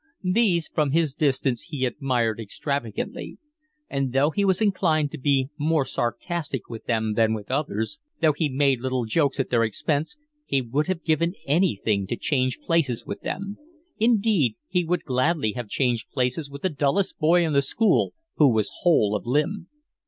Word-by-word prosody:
These 185 Hz, -7 st, +2 dB
from 150 Hz, -3 st, 0 dB
his 160 Hz, -4 st, +2 dB
distance 135 Hz, -4 st, 0 dB
he 140 Hz, -5 st, -1 dB
admired 120 Hz, -4 st, 0 dB
extravagantly; 115 Hz, +1 st, -4 dB, 0.5 s
and 135 Hz, -2 st, -2 dB
though 140 Hz, +3 st, +3 dB
he 200 Hz, -, 0 dB
was 190 Hz, -2 st, +3 dB
inclined 165 Hz, -8 st, +2 dB
to -, -, -7 dB
be 135 Hz, 0 st, +2 dB
more 155 Hz, -1 st, +2 dB
sarcastic 135 Hz, -, -3 dB
with 115 Hz, -2 st, -8 dB
them 110 Hz, -2 st, 0 dB
than 110 Hz, 0 st, +2 dB
with 105 Hz, +2 st, -7 dB
others, 135 Hz, -, -2 dB, 0.2 s
though 155 Hz, -2 st, +4 dB
he 150 Hz, +1 st, 0 dB
made 135 Hz, -1 st, +2 dB
little 130 Hz, -2 st, -1 dB
jokes 140 Hz, +4 st, +1 dB
at 135 Hz, -, -1 dB
their 115 Hz, -2 st, +3 dB
expense, 145 Hz, -, -1 dB, 0.3 s
he 135 Hz, -, +2 dB
would 135 Hz, +5 st, -1 dB
have 185 Hz, -3 st, -2 dB
given 170 Hz, +3 st, +1 dB
anything 115 Hz, -, +1 dB
to 120 Hz, -, -2 dB
change 130 Hz, -1 st, 0 dB
places 150 Hz, -8 st, 0 dB
with -, -, -6 dB
them. 200 Hz, +1 st, -5 dB, 0.4 s
Indeed 210 Hz, -, +3 dB
he 180 Hz, -1 st, +1 dB
would 175 Hz, +1 st, -1 dB
gladly 130 Hz, -2 st, +1 dB
have 120 Hz, -2 st, -6 dB
changed 120 Hz, -3 st, 0 dB
places 130 Hz, +3 st, -1 dB
with 140 Hz, 0 st, -10 dB
the 185 Hz, -, +2 dB
dullest 150 Hz, +5 st, 0 dB
boy 170 Hz, +2 st, +4 dB
in 155 Hz, -, -1 dB
the 140 Hz, -, +4 dB
school 200 Hz, +9 st, +2 dB, 0.2 s
who 145 Hz, -4 st, +6 dB
was 110 Hz, -2 st, 0 dB
whole 110 Hz, -, +3 dB
of 105 Hz, -, -4 dB
limb. 155 Hz, +8 st, 0 dB
140 Hz, 175 wpm, -25 LUFS, 125-165 Hz, 0.5 s, who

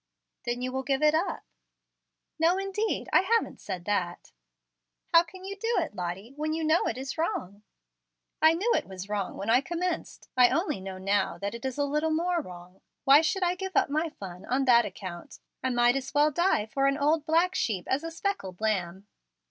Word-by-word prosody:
"Then 240 Hz, +1 st, -2 dB
you 255 Hz, -, -2 dB
will 265 Hz, +1 st, -2 dB
give 270 Hz, +2 st, -1 dB
it 300 Hz, 0 st, +5 dB
up." 325 Hz, +5 st, -1 dB, 1.0 s
"No 335 Hz, +3 st, +4 dB
indeed. 390 Hz, +3 st, -2 dB
I -, -, +8 dB
haven't 455 Hz, +4 st, 0 dB
said 185 Hz, -3 st, -5 dB
that." 180 Hz, -4 st, -2 dB, 0.8 s
"How 335 Hz, -, +9 dB
can 370 Hz, +2 st, -11 dB
you 400 Hz, +1 st, -5 dB
do 455 Hz, +4 st, -1 dB
it, 325 Hz, -, -1 dB
Lottie, 185 Hz, +7 st, -5 dB
when 310 Hz, +1 st, -2 dB
you 325 Hz, 0 st, -2 dB
know 315 Hz, +2 st, +3 dB
it -, -, -2 dB
is 270 Hz, +4 st, -5 dB
wrong?" 205 Hz, -, -2 dB, 0.8 s
"I 315 Hz, +1 st, +6 dB
knew 415 Hz, +8 st, 0 dB
it -, -, 0 dB
was 190 Hz, +1 st, -8 dB
wrong 205 Hz, -2 st, -3 dB
when 205 Hz, +3 st, -1 dB
I 245 Hz, +3 st, +5 dB
commenced. 350 Hz, +1 st, -4 dB
I 250 Hz, -1 st, +6 dB
only 315 Hz, -, -1 dB
know 190 Hz, 0 st, -6 dB
now 195 Hz, +2 st, 0 dB
that 200 Hz, +1 st, -4 dB
it 235 Hz, +3 st, -7 dB
is 260 Hz, 0 st, -3 dB
a 285 Hz, -, +1 dB
little 300 Hz, +3 st, 0 dB
more 340 Hz, +2 st, +1 dB
wrong. 180 Hz, -, -12 dB, 0.2 s
Why 280 Hz, +3 st, +7 dB
should 365 Hz, +4 st, 0 dB
I 355 Hz, 0 st, +2 dB
give 380 Hz, 0 st, -6 dB
up -, -, +3 dB
my 310 Hz, +3 st, 0 dB
fun 190 Hz, -, -9 dB
on 265 Hz, +2 st, 0 dB
that 235 Hz, -2 st, +6 dB
account? 185 Hz, -3 st, -8 dB, 0.2 s
I 260 Hz, -, 0 dB
might 240 Hz, 0 st, +3 dB
as 270 Hz, +1 st, -4 dB
well 295 Hz, +1 st, +4 dB
die 345 Hz, -, +2 dB
for 275 Hz, +5 st, 0 dB
an 275 Hz, 0 st, +1 dB
old 300 Hz, +2 st, +2 dB
black 335 Hz, +3 st, +3 dB
sheep 195 Hz, -, -1 dB
as 265 Hz, +4 st, 0 dB
a 330 Hz, -, -3 dB
speckled 330 Hz, -, -4 dB
lamb." 195 Hz, -3 st, -1 dB
275 Hz, 205 wpm, -28 LUFS, 205-330 Hz, 1.0 s, How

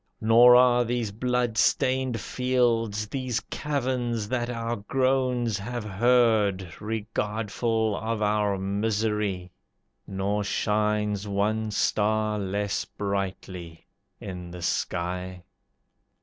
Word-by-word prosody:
Nor 120 Hz, +2 st, +7 dB
are 125 Hz, -1 st, +5 dB
these 120 Hz, -2 st, -2 dB
blood 120 Hz, 0 st, 0 dB
stained 130 Hz, -1 st, +2 dB
fields, 115 Hz, -4 st, 0 dB
These 130 Hz, 0 st, -2 dB
caverns, 125 Hz, -6 st, -2 dB
that 120 Hz, -1 st, -1 dB
our 115 Hz, -1 st, -2 dB
groans 125 Hz, -1 st, 0 dB
have 120 Hz, +3 st, -4 dB
heard, 105 Hz, -3 st, +2 dB
Regardful 110 Hz, 0 st, -1 dB
of 110 Hz, +1 st, -2 dB
our 105 Hz, -1 st, +1 dB
misery; 100 Hz, -1 st, -1 dB, 0.6 s
Nor 100 Hz, +2 st, -1 dB
shines 105 Hz, 0 st, 0 dB
one 105 Hz, +2 st, 0 dB
star 105 Hz, 0 st, +1 dB
less 100 Hz, +1 st, -1 dB
brightly 95 Hz, -4 st, -5 dB, 0.3 s
in 90 Hz, -2 st, -7 dB
the 90 Hz, 0 st, -8 dB
sky. 90 Hz, +1 st, -2 dB
110 Hz, 95 wpm, -26 LUFS, 100-120 Hz, 0.6 s, Nor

